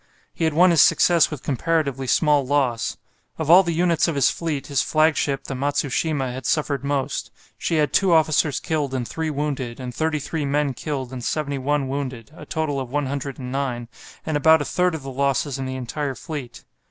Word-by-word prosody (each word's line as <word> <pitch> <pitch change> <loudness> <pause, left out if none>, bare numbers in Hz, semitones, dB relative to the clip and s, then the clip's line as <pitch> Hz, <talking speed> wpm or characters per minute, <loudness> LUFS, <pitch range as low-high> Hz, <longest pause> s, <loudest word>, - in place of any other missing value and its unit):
He 165 - -1
had 160 -2 0
won 180 +2 +6
his 165 -4 +5
success 170 -2 +5
with 150 -4 -7
comparatively 140 -2 -1
small 150 0 +3
loss. 130 -4 0 0.4
Of 160 -1 0
all 180 +2 +9
the 170 -3 -2
units 170 0 +2
of 165 - -1
his 140 -2 +3
fleet 155 -5 -3
his 140 -2 0
flagship, 155 -3 +1
the - - -5
"Matsushima," 140 0 -1
had 130 - -5
suffered 145 -4 0
most. 140 -1 -2 0.3
She 165 - -2
had 150 -3 +1
two 195 -2 +3
officers 155 -3 +3
killed 145 -4 -2
and 125 -2 -2
three 160 -1 -3
wounded, 140 -5 -3
and 125 -1 -6
33 155 0 -2
men 140 0 0
killed 135 -3 -4
and 125 -2 -6
71 140 0 -1
wounded, 130 -3 -5
a - - -11
total 155 -4 -1
of 130 -2 -5
109, 135 -3 -3 0.4
and 155 -2 0
about 160 +2 +5
a - - -8
third 180 -2 +1
of 150 - -7
the 135 - -6
losses 140 +1 0
in 135 - -3
the 130 - -4
entire 135 +2 -3
fleet. 140 -7 -7
145 Hz, 190 wpm, -23 LUFS, 135-155 Hz, 0.4 s, all